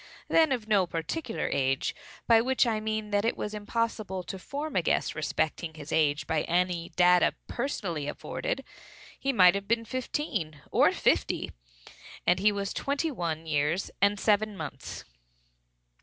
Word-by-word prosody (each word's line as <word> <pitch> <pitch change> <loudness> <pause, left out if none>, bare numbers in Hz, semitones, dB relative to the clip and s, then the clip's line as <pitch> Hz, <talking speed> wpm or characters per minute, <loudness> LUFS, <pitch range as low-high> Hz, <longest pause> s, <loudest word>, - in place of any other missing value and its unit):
He - - -8
was - - +5
then 320 -3 +4
of 240 -5 -1
no 200 -4 +3
particular 225 - -3
age, 135 0 +1 0.3
by 230 -1 +6
which 260 +2 +2
I 225 -2 0
mean 215 -1 -3
that 205 0 +2
it 230 - 0
was 210 - -4
impossible 210 -3 -2
to 190 +2 -6
form 290 +9 -5
a 185 - +4
guess - - +1
respecting 160 +1 -2
his 150 -1 -9
age 145 -2 +2
by 155 +1 0
any 175 -1 0
data 180 0 +5
personally 180 - -3
afforded. - - -3 0.6
He 275 - +1
might 185 -8 +7
have 200 0 -4
been 230 0 +1
fifteen 220 - -3
or - - +5
fifty, - - +1 0.7
and 180 +1 +3
was 200 0 +1
twenty 285 +3 -1
one 165 - -3
years 155 +4 0
and 200 0 +3
seven 210 -1 +2
months. 145 -4 -7
200 Hz, 155 wpm, -28 LUFS, 165-230 Hz, 0.7 s, might